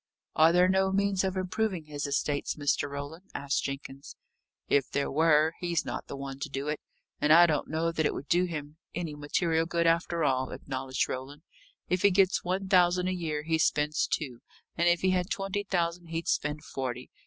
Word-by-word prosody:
"Are 160 +1 +6
there 180 +1 +5
no 190 0 +2
means 200 -1 +1
of 190 0 -1
improving 185 -2 -1
his 145 -1 -4
estates, 145 0 -1
Mr. 145 -1 0
Roland?" 145 +6 -7
asked 140 0 -1
Jenkins. 140 0 -6 0.5
"If 140 -2 +2
there 140 0 -1
were, 155 +1 +4
he's 175 -2 -1
not - - -5
the - - -6
one 135 0 -6
to 145 - -4
do 135 +1 -4
it. 150 - -2 0.4
And 150 +1 +2
I 170 +2 +9
don't 155 -4 0
know 160 +2 0
that 160 -2 +1
it - - -3
would 140 - -6
do 175 +1 +3
him 150 -3 -6 0.2
any 170 -3 -3
material 160 +3 0
good, 170 0 0
after 170 0 +2
all," 130 -2 +1
acknowledged 130 -1 -3
Roland. 140 +4 -6 0.4
"If 180 0 0
he 200 - +6
gets 190 -1 +3
one 190 +2 -2
thousand 180 -1 +4
a - - 0
year, 155 -4 -3
he 160 0 0
spends 150 -1 +1
two; 130 -6 -3 0.4
and 170 +1 +3
if 175 0 +2
he 185 - +3
had 180 0 0
twenty 195 +1 -2
thousand, 175 -2 -1
he'd 165 0 -4
spend 150 +1 -1
forty. 125 -1 -5
160 Hz, 200 wpm, -29 LUFS, 145-180 Hz, 0.5 s, I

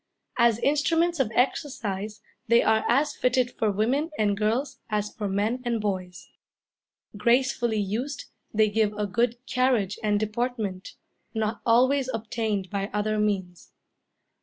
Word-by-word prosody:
As 235 -2 +5
instruments 325 +5 +1
of 245 -5 +1
exercise 215 -6 -1 0.3
they 235 +1 +5
are 220 0 +3
as 280 +5 +2
fitted 250 0 +1
for 220 - 0
women 245 +10 +1
and 205 -2 +2
girls 235 +6 -1
as 210 -1 -1
for 210 - -3
men 210 +6 0
and 235 -2 -1
boys. 185 -4 -4 0.9
Gracefully 240 0 +2
used, 245 +8 -3 0.3
they 215 0 +3
give 210 0 +1
a 210 0 -2
good 235 +4 +1
carriage 245 -7 +1
and 210 -1 +1
deportment, 215 -3 -3 0.4
not 220 +1 -1
always 260 +3 +4
obtained 215 -3 -2
by 200 0 -2
other 215 +1 0
means. 190 -5 -2
220 Hz, 135 wpm, -26 LUFS, 205-250 Hz, 0.9 s, As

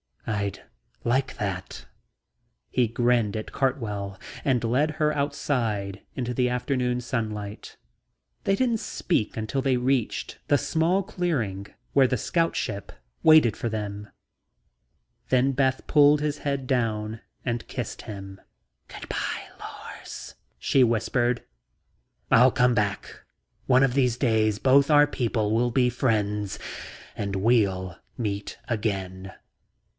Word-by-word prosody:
"I'd 100 -3 -2 0.4
like 130 +3 0
that." 95 -3 -4 0.9
He 125 -2 +2
grinned 120 -2 +1
at 110 - -6
Cartwell 105 -8 -2 0.3
and 130 -4 +1
led 130 +7 +2
her 150 0 0
outside 115 -9 -1
into 125 -1 -2
the 125 0 +2
afternoon 125 0 0
sunlight. 110 -4 -4 0.7
They 195 - +3
didn't 235 -1 +1
speak 165 - -1
until 110 +5 -1
they 130 -2 +2
reached 125 -1 -1
the 145 - +4
small 170 +7 +1
clearing 115 - -2 0.3
where 135 -2 +6
the 125 - 0
scout 165 +8 0
ship 100 -1 -3 0.3
waited 155 -9 +6
for 120 - -3
them. 105 -1 -5 1.2
Then 130 +1 +3
Beth 130 0 +1
pulled 145 0 +5
his 150 -1 -1
head 140 -2 -2
down 110 -4 -1 0.3
and 120 -2 -2
kissed - - -5
him. 95 -2 -8 0.5
"Good - - -9
by, - - -2 0.2
Lors," - - -9 0.2
she 135 - +3
whispered. 120 +1 +1 0.9
"I'll 125 +3 +7
come 125 +1 +3
back, 105 -3 0
Beth, - - -13
I'll - - -11
come - - -17
back. - - -28 0.4
One 130 0 +5
of 135 -2 +2
these 125 -3 +2
days 110 -5 +2
both 135 +4 +4
our 145 -1 +7
people 115 -6 0
will 120 +2 +2
be 125 0 +3
friends 105 -5 0 0.6
and 100 -1 -3
we'll 95 -4 +1 0.2
meet 100 -4 -3
again." 95 -4 -3
120 Hz, 130 wpm, -26 LUFS, 105-135 Hz, 1.2 s, I'll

